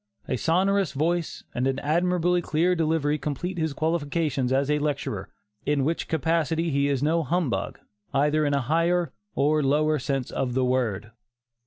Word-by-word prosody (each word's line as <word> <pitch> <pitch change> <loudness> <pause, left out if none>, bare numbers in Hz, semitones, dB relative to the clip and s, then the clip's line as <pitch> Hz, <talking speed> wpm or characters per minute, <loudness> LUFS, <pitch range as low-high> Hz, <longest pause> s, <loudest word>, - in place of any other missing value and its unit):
A - - 0
sonorous 190 +6 +1
voice 165 +3 -1
and 125 +2 0
an 135 0 0
admirably 175 +4 +1
clear 170 +3 +1
delivery 155 -3 +1
complete 165 +6 -3
his 160 -1 0
qualifications 150 -3 -1
as 135 +2 +2
a 150 - +2
lecturer, 145 -1 -2 0.3
in 145 -2 +1
which 165 +4 -1
capacity 160 +1 0
he 140 0 +2
is 140 -1 0
no 165 +3 +2
'humbug,' 150 - -1 0.3
either 150 +2 +2
in 145 -1 +1
a 140 - +1
higher 165 +3 +1 0.2
or 150 +2 +2
lower 150 +2 +2
sense 135 -1 -2
of 125 -2 -2
the 130 -1 +2
word." 110 -5 -1
150 Hz, 160 wpm, -26 LUFS, 135-165 Hz, 0.3 s, as